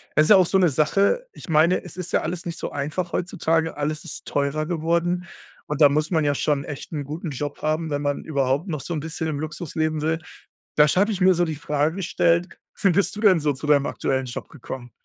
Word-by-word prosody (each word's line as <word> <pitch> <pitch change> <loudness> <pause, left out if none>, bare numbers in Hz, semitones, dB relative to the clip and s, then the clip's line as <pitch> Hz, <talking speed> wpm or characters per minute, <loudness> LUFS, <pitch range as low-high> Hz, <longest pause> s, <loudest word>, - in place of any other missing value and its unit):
Es 155 - +6
ist - - 0
ja 210 - +10
auch 185 - +6
so 190 - +2
'ne 180 -2 +5
Sache. 195 - +2
Ich - - -12
meine, 165 +2 +3
es - - -10
ist 180 -1 -5
ja - - +2
alles 175 -1 -4
nicht 170 -1 -5
so - - -4
einfach 155 +5 -3
heutzutage. 165 -3 0
Alles 150 +1 -2
ist - - -8
teurer 145 +2 -1
geworden. 170 +2 0 0.4
Und 150 -1 -3
da 145 - +10
muss 150 +4 0
man 160 -3 +2
ja 145 -1 +2
schon 140 -1 0
echt 145 -1 -7
'n 145 -4 -4
guten 155 +4 -5
Job 145 +1 -5
haben, 155 +1 -1
wenn 145 -1 -2
man 145 -1 -2
überhaupt 140 +2 0
noch 155 -6 -3
so 170 +6 -4
'n 155 - -1
bisschen 160 +2 -4
im 145 - -3
Luxus 155 +1 -6
leben 155 -1 0
will. 160 +1 0 0.6
Da 150 0 +6
sch 165 - +1
hatte 205 +3 +3
ich 195 - -3
mir 185 0 +6
so 175 +1 +2
die 160 -2 -3
Frage 150 +2 0
gestellt: 170 -1 +1 0.2
„Wie 195 - +5
bist 195 +3 +1
du 210 - -6
denn 195 -6 +5
so 150 -1 +1
zu 145 +3 -7
deinem 145 -2 +4
aktuellen 130 -2 -1
Job 120 - -7
gekommen?“ 125 -4 -8
155 Hz, 245 wpm, -23 LUFS, 145-175 Hz, 0.6 s, ja